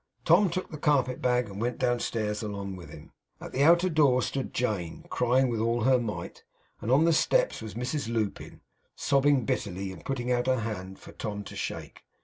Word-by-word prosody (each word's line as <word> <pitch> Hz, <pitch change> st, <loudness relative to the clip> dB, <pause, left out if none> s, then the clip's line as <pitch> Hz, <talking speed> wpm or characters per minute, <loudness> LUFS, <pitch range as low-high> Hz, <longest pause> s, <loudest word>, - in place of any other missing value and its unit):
Tom 205 Hz, -3 st, +5 dB
took 185 Hz, +2 st, -4 dB
the 155 Hz, -, -7 dB
carpet 130 Hz, -4 st, +1 dB
bag, 125 Hz, -1 st, +2 dB
and 100 Hz, +1 st, -7 dB
went 120 Hz, +1 st, -1 dB
downstairs 115 Hz, -3 st, -1 dB
along 100 Hz, -3 st, -5 dB
with 90 Hz, -2 st, -10 dB
him. -, -, -12 dB, 0.3 s
At -, -, -8 dB
the 135 Hz, -, -1 dB
outer 170 Hz, +4 st, +6 dB
door 145 Hz, -7 st, +3 dB
stood 135 Hz, -1 st, -3 dB
Jane, 100 Hz, -9 st, -2 dB
crying 125 Hz, +2 st, +3 dB
with 115 Hz, -3 st, -1 dB
all 115 Hz, +2 st, +1 dB
her 130 Hz, +2 st, +4 dB
might; 115 Hz, -3 st, -5 dB, 0.4 s
and 110 Hz, -, -4 dB
on 145 Hz, +5 st, +5 dB
the 165 Hz, -, +4 dB
steps -, -, +2 dB
was 110 Hz, -1 st, -7 dB
Mrs 125 Hz, 0 st, -3 dB
Lupin, 110 Hz, -3 st, -3 dB, 0.3 s
sobbing 140 Hz, -2 st, +2 dB
bitterly, 95 Hz, -3 st, -2 dB
and 95 Hz, -, -11 dB
putting 125 Hz, -2 st, -2 dB
out 125 Hz, 0 st, +1 dB
her 130 Hz, -2 st, +2 dB
hand 95 Hz, -4 st, -5 dB
for -, -, -13 dB
Tom 105 Hz, -2 st, -5 dB
to -, -, -10 dB
shake. -, -, -5 dB
120 Hz, 195 wpm, -28 LUFS, 105-135 Hz, 0.4 s, outer